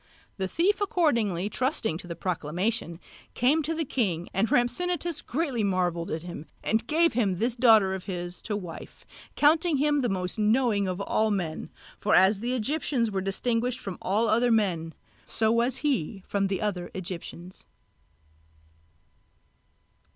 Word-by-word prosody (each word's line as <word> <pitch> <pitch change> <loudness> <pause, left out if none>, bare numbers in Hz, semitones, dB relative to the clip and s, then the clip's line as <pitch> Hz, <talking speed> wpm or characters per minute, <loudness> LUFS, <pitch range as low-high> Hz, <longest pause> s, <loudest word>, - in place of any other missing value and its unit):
The 190 -1 -1
thief 380 - +1
accordingly 235 - +1
trusting 225 - -1
to 180 - -10
the 170 - -5
proclamation 175 +2 -2 0.4
came 280 +6 +3
to 325 +2 -2
the 320 0 -1
king, 185 -11 -1
and 200 +3 +1
Rhampsinitos 340 +6 0
greatly 270 -5 -2
marvelled 180 -3 0
at 155 +1 -3
him, 175 -3 -8 0.2
and 220 +1 0
gave 330 +2 +3
him 205 -6 +1
this 235 +4 +1
daughter 220 -6 +5
of 190 -1 -6
his 175 -2 -5
to 210 -2 -3
wife, 175 -5 -9 0.3
counting 315 +1 +4
him 295 +1 +2
to - - +2
be 255 - +1
the 200 - 0
most 180 +4 -2
knowing 215 -2 +2
of 185 +1 -3
all 215 +2 +1
men; 175 -6 -3 0.3
for 210 - +2
as 195 +2 +5
the 245 +4 -1
Egyptians 255 -2 -1
were 195 -1 -1
distinguished 230 +5 -1
from 195 -2 -7
all 210 +5 +1
other 235 +2 +3
men, 180 -8 +1 0.3
so 220 -1 +1
was 235 +3 +1
he 200 - -1
from 200 -1 0
the 195 -1 -2
other 180 -4 -2
Egyptians. 180 0 -7
215 Hz, 160 wpm, -27 LUFS, 185-250 Hz, 0.4 s, daughter